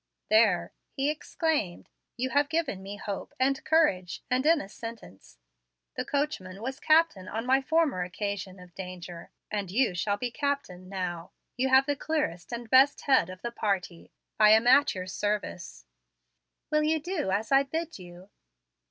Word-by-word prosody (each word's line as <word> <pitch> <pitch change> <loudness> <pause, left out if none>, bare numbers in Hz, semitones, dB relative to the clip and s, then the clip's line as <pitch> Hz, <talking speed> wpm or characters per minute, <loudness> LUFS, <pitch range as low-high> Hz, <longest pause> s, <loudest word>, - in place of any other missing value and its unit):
"There!" 215 -5 +4 0.2
he 275 +2 0
exclaimed, 305 - -2 0.3
"you 260 +2 -2
have 285 0 +2
given 315 - -1
me 195 +1 -7
hope 205 -1 -6
and 270 +1 +1
courage, 190 - +1
and 255 +1 +2
in 330 -1 +5
a 195 - -6
sentence. 215 - -10 0.6
The - - -2
coachman 220 -10 -3
was 265 +2 -4
captain 310 - +3
on 225 +2 -4
my 265 +2 +3
former 305 - +1
occasion 190 +1 -4
of 180 -1 -14
danger, 180 -2 -8 0.2
and 205 -3 -2
you 230 +1 +2
shall 200 +4 -1
be 245 +3 -3
captain 235 -11 -3
now. 180 -3 -4 0.2
You 260 +2 0
have 265 +1 +6
the 290 0 0
clearest 285 - -2
and 235 0 -5
best 265 +4 +5
head 265 - +3
of 185 +1 -10
the 235 - -3
party. 190 -6 -3 0.3
I 215 -1 +7
am 220 +2 +4
at 265 +1 +5
your 185 -1 -4
service." 185 - -4 0.9
"Will 305 0 +3
you 315 +1 +1
do 330 - -3
as 205 +5 -1
I 270 0 +6
bid 320 +1 -4
you?" 180 +2 -13
225 Hz, 165 wpm, -28 LUFS, 185-280 Hz, 0.9 s, I